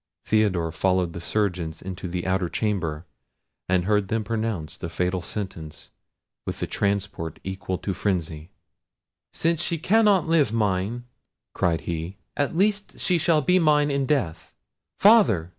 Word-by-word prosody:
Theodore 95 -7 +2
followed 90 +1 +1
the 85 - -6
surgeons 90 -4 -1
into 95 -1 -6
the 90 0 -4
outer 95 -1 0
chamber, 85 -8 -2 0.6
and 90 -1 +2
heard 105 -1 +2
them 110 +1 -1
pronounce 110 -8 -3
the 85 - -6
fatal 90 +2 -1
sentence 85 -4 -7 0.5
with - - -5
a - - +2
transport 100 -5 -2
equal 95 -1 -3
to 95 - -3
frenzy. 85 -5 -2 0.8
"Since 165 0 0
she 170 -1 -1
cannot 200 +1 +3
live 160 -8 +3
mine," 105 +2 -1 0.5
cried 85 -2 +1
he, 85 +3 -4 0.2
"at 145 +3 -1
least 205 +1 0
she 180 -2 +2
shall 155 -2 +3
be 180 +6 +4
mine 150 -3 +3
in 140 -1 0
death! 90 - -1 0.4
Father! 195 - +5
100 Hz, 140 wpm, -25 LUFS, 85-140 Hz, 0.8 s, Father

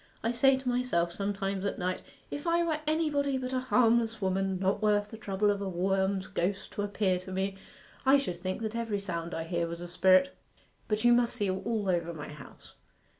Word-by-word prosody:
I 230 - +1
say 265 +3 +4
to 265 -1 -8
myself 245 -9 +1
sometimes 195 -1 -2
at 200 - -2
night, 185 0 -2 0.3
"If 290 +4 -5
I 340 0 +3
were 320 -2 0
anybody 295 -3 +1
but 255 0 -4
a 255 - +1
harmless 235 -3 +2
woman, 190 0 0
not 190 +2 0
worth 210 -1 +2
the - - -7
trouble 205 -1 +1
of 200 0 -2
a 195 - -2
worm's 190 +1 0
ghost 190 +3 -2
to - - -3
appear 200 -2 0
to 185 +1 -9
me, 190 +1 -1 0.5
I 270 +1 +6
should 225 -11 -3
think 185 +5 -4
that 220 0 -3
every 225 -3 -1
sound 170 -3 -4
I 165 - -2
hear 170 0 -1
was 170 0 -5
a 175 - -6
spirit." 185 +9 +4 0.5
But 210 +1 0
you 240 0 +6
must 240 0 +2
see 205 -5 0
all 205 +2 -2
over 170 -2 0
my 150 - -7
house. 150 -2 -13
200 Hz, 210 wpm, -30 LUFS, 185-240 Hz, 0.5 s, I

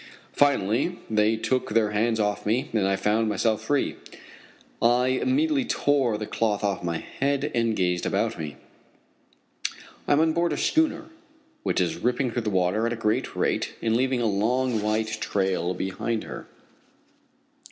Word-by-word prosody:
Finally 140 - +2
they 110 +1 +3
took 130 +3 -1
their 110 -1 +2
hands 110 +2 +1
from 105 - +2
off 105 - -3
me, 115 +5 0
and 105 -4 +2
I 95 - +2
found 110 +3 +1
myself 110 +1 +1
free. 145 -1 0 0.8
I 120 +2 +4
immediately 275 - +1
tore 140 - +1
the 105 - -4
cloth 105 -1 -1
off 100 -3 -1
my 85 -1 -1
head 140 - -2
and 115 -2 +1
gazed 90 -2 0
about - - -1
me. 75 -2 -5 1.5
I - - +4
am 145 - +4
on 160 0 +3
board 170 +1 +1
a - - -3
schooner 315 0 +1 0.6
which - - 0
is 85 -3 0
ripping 125 +1 0
through 120 - -1
the 110 - -2
water 95 +4 +1
at 120 - -1
a - - -2
great 110 -1 -1
rate - - -1
and 115 -1 0
leaving 130 0 +1
a - - +1
long 115 +3 +1
white 110 +1 -1
trail 95 -3 0
behind 110 +5 -2
her. - - -8
115 Hz, 165 wpm, -25 LUFS, 105-130 Hz, 1.5 s, I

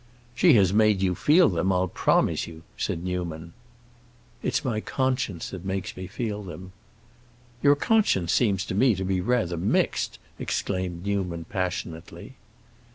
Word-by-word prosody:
"She 165 +6 +5
has 100 -5 +4
made 105 -2 +3
you 90 -1 +2
feel 160 - +5
them, 90 +1 +1
I'll 90 0 +1
promise - - +1
you!" 80 -1 -11
said 85 - -3
Newman. 85 -2 -4 0.9
"It's - - -1
my 115 -4 0
conscience 125 - -2
that 95 -2 -7
makes 95 -1 -3
me 95 0 -6
feel 105 +1 -4
them." 95 0 -9 0.9
"Your 145 0 +5
conscience 145 - +2
seems 100 -5 +2
to - - -4
me 115 +3 +4
to 95 - -3
be 95 -1 0
rather 110 -6 0
mixed!" 90 +4 0 0.2
exclaimed 90 -2 -3
Newman, 90 -5 -2
passionately. 90 -4 -5
95 Hz, 145 wpm, -26 LUFS, 90-110 Hz, 0.9 s, She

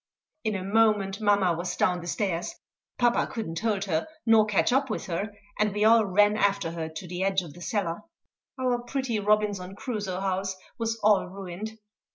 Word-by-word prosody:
In 215 -2 0
a 190 - -3
moment 205 -1 +2
mamma 200 -4 +3
was 175 +2 -3
down 180 -1 +1
the 170 - -8
stairs; 190 - -2 0.4
papa 240 -1 +3
could 230 -4 -4
not 165 0 -4
hold 210 -3 0
her 160 -5 -1 0.2
nor 225 -2 +5
catch 210 +4 +2
up 270 0 +2
with 215 - -3
her, 195 +3 -3 0.3
and 210 0 +2
we 210 +1 +1
all 225 0 +6
ran 205 +2 +4
after 200 -5 +1
her 165 -1 -4
to 160 +3 -8
the 175 +1 -4
edge 190 -1 +1
of 155 -4 -10
the 175 - -13
cellar. 175 -2 -2 0.6
Our 250 -1 +1
pretty 245 -2 -2
Robinson 205 -2 +1
Crusoe 205 -6 -3
house 190 0 -1 0.2
was 225 0 -1
all 210 -2 +4
ruined. 195 +3 -7
200 Hz, 190 wpm, -27 LUFS, 185-220 Hz, 0.6 s, all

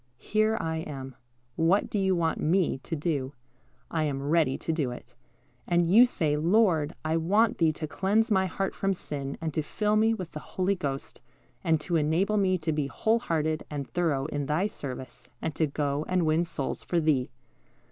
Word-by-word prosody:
Here 215 - +1
I 160 0 -2
am. 135 -5 -6 0.4
What 170 +5 +3
do 210 - -2
you 190 -1 +2
want 165 -2 0
Me 170 -3 +1
to 165 - -5
do? 145 -4 -2 0.6
I 160 -2 +1
am 140 -2 -2
ready 155 -5 +3
to 165 - -2
do 150 -5 0
it." 120 0 -9 0.5
And 175 -1 +3
you 225 +8 +7
say, 155 -10 0
"Lord, 165 -2 +2
I 160 +1 +1
want 205 +7 +2
Thee 165 -2 +4
to 155 - -5
cleanse 205 +8 +1
my 190 -2 +3
heart 195 +1 -2
from 195 0 0
sin, 140 -5 -5
and 160 -2 -3
to 155 - 0
fill 210 +7 0
me 225 +1 +3
with 185 -6 -6
the 150 - -6
Holy 185 +5 -1
Ghost, 140 -7 -5 0.4
and 160 -1 +2
to 170 +1 0
enable 170 +8 +1
me 190 -2 +2
to 160 -1 -2
be 150 -2 -1
whole 220 - +1
hearted 155 -7 -1
and 145 -2 -4
thorough 155 -6 0
in 145 -2 -3
Thy 155 +7 +1
service, 130 - -7
and 160 - -3
to 155 +1 +1
go 145 0 -1
and 180 -2 +2
win 160 +2 +2
souls 140 -5 -4
for 175 - 0
Thee." 150 -6 +1
160 Hz, 195 wpm, -28 LUFS, 145-190 Hz, 0.6 s, you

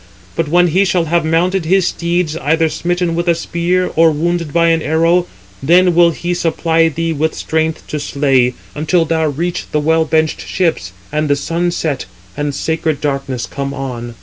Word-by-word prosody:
But 165 - -1
when 175 +2 +4
he 185 +5 +3
shall 180 -3 +1
have 170 +1 +1
mounted 170 +3 +1
his 190 +2 +3
steeds, 170 -2 -1
either 160 +2 +1
smitten 175 +1 -1
with 170 +1 -2
a 170 - +4
spear, 175 +2 -1
or 165 0 +5
wounded 165 +1 -1
by 170 +2 +3
an 165 -1 +2
arrow, 165 +3 +2 0.3
then 175 +5 +4
will 170 0 +5
he 175 +1 -3
supply 165 -1 +1
thee 165 +1 -2
with 155 +1 -1
strength 160 0 -2
to 150 - -3
slay, 135 -4 +1 0.2
until 165 +3 +1
thou 160 0 0
reach 170 +5 -3
the 150 - +1
well 160 +2 +2
benched 155 0 0
ships, 165 - -1 0.2
and 150 0 -1
the 145 - +4
sun 165 +5 -1
set, 155 -5 -3 0.3
and 145 -1 -2
sacred 160 -1 -1
darkness 135 -4 -2
come 140 0 -5
on." 120 -3 -6
160 Hz, 180 wpm, -16 LUFS, 150-170 Hz, 0.3 s, or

